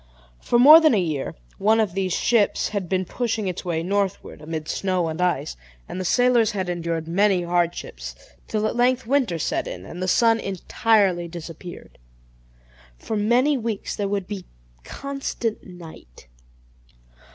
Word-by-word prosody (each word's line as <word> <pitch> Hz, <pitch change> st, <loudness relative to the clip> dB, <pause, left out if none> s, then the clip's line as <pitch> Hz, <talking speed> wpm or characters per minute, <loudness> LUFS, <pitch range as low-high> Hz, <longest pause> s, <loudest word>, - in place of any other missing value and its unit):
For 240 Hz, -, +1 dB
more 295 Hz, +6 st, +10 dB
than 310 Hz, -7 st, +4 dB
a -, -, +3 dB
year 155 Hz, -6 st, -2 dB, 0.2 s
one 220 Hz, +3 st, +3 dB
of 210 Hz, -5 st, +1 dB
these 190 Hz, -1 st, -1 dB
ships 215 Hz, +3 st, +2 dB
had 200 Hz, -5 st, -4 dB
been 185 Hz, 0 st, 0 dB
pushing 225 Hz, -1 st, -2 dB
its 180 Hz, -1 st, -4 dB
way 165 Hz, -3 st, -2 dB
northward, 195 Hz, +1 st, -2 dB
amid 155 Hz, 0 st, -5 dB
snow 185 Hz, -3 st, -1 dB
and 160 Hz, +2 st, -4 dB
ice, 175 Hz, -, 0 dB, 0.3 s
and 185 Hz, -, -5 dB
the -, -, -4 dB
sailors 245 Hz, +1 st, +3 dB
had 190 Hz, -3 st, -3 dB
endured 165 Hz, -2 st, -3 dB
many 190 Hz, +1 st, +2 dB
hardships; 170 Hz, -, -2 dB, 0.3 s
till 215 Hz, -1 st, -1 dB
at 215 Hz, -, -1 dB
length 250 Hz, +1 st, +2 dB
winter 245 Hz, -8 st, +1 dB
set 155 Hz, -, -2 dB
in, -, -, -7 dB
and 175 Hz, -, -8 dB
the 185 Hz, -, -1 dB
sun 225 Hz, +4 st, +3 dB
entirely 195 Hz, -2 st, +1 dB
disappeared; 170 Hz, +1 st, -10 dB, 1.0 s
for 220 Hz, -, -5 dB
many 245 Hz, +7 st, +2 dB
weeks 225 Hz, -3 st, -4 dB
there 200 Hz, -1 st, -2 dB
would 200 Hz, -2 st, -2 dB
be 195 Hz, -2 st, -7 dB, 0.4 s
constant 275 Hz, -, -4 dB
night. 165 Hz, -, -13 dB
195 Hz, 155 wpm, -23 LUFS, 175-225 Hz, 1.0 s, more